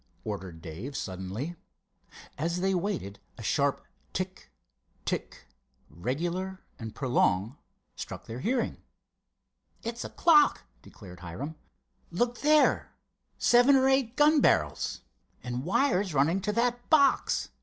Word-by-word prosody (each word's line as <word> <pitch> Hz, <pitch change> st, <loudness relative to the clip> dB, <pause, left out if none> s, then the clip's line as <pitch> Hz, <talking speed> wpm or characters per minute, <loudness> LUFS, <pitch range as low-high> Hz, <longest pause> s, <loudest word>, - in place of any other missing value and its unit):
ordered 85 Hz, -3 st, -6 dB
Dave, 100 Hz, -, -6 dB
suddenly. 95 Hz, -, -5 dB, 0.8 s
As 170 Hz, +4 st, -1 dB
they 190 Hz, +1 st, +1 dB
waited 175 Hz, -, -2 dB, 0.2 s
a -, -, -9 dB
sharp -, -, +1 dB, 0.3 s
tick—tick, -, -, -6 dB, 0.5 s
regular 175 Hz, -, -3 dB, 0.2 s
and 110 Hz, -1 st, -7 dB
prolonged, 120 Hz, -3 st, +1 dB, 0.4 s
struck -, -, -7 dB
their 115 Hz, +2 st, -6 dB
hearing. 240 Hz, -, -1 dB, 1.1 s
"It's 230 Hz, +1 st, -4 dB
a -, -, -6 dB
clock," 305 Hz, -4 st, +4 dB, 0.2 s
declared 90 Hz, -1 st, -13 dB
Hiram. 95 Hz, -, -6 dB, 0.6 s
"Look 240 Hz, +7 st, -1 dB
there—seven 280 Hz, -3 st, +3 dB
or 265 Hz, 0 st, +4 dB
eight 265 Hz, -3 st, +2 dB
gun 295 Hz, +1 st, +5 dB
barrels. -, -, +1 dB, 0.4 s
And 125 Hz, +2 st, -4 dB
wires 190 Hz, -, +1 dB
running 160 Hz, +8 st, +3 dB
to 210 Hz, -, -1 dB
that 240 Hz, +2 st, 0 dB
box. 285 Hz, -4 st, +3 dB
175 Hz, 110 wpm, -29 LUFS, -, 1.1 s, gun